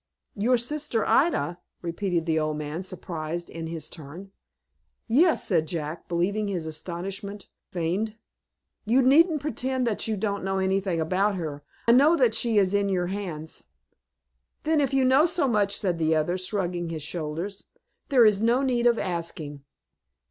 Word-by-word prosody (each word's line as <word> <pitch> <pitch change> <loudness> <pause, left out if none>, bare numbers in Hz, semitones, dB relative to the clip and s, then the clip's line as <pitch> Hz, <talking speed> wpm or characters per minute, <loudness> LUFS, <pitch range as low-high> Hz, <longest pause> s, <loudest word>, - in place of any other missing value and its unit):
"Your 240 +4 +3
sister 245 -2 -1
Ida!" 180 - +2 0.2
repeated 170 0 -1
the 160 -2 +1
old 155 -1 -1
man, 150 +3 -4
surprised 175 -2 -5
in 165 0 -5
his 160 -2 -4
turn. 165 +5 -10 0.8
"Yes," 315 +9 +3
said 165 -5 +2
Jack; 155 0 -5
believing, 195 +5 0
his 180 -5 -3
astonishment 190 +5 -5 0.2
feigned. 185 +6 -2 0.7
"You 245 +5 +3
needn't 305 +4 +5
pretend 260 -3 -1
that 225 -2 -1
you 220 -1 -1
don't 200 -1 -2
know 195 0 -1
anything 190 -2 0
about 190 +5 +1
her. 150 -5 -5 0.2
I - - +7
know 285 +7 +6
that 250 -8 +3
she 225 -1 +1
is 195 -1 +3
in 200 0 +2
your 180 -2 0
hands." 165 -6 -5 1.0
"Then 310 -1 +2
if 275 - +1
you 270 -1 +3
know 270 +6 +5
so 335 -5 +1
much," 205 -4 +1
said 180 -4 -1
the 160 0 +2
other, 155 +3 +1
shrugging 180 -2 -2
his 160 -3 -5
shoulders, 165 +5 -4 0.4
"there 255 -5 +6
is 210 -2 +4
no 240 +4 +3
need 245 -2 +2
of 235 -1 +4
asking." 165 -6 -4
195 Hz, 160 wpm, -26 LUFS, 165-235 Hz, 1.0 s, I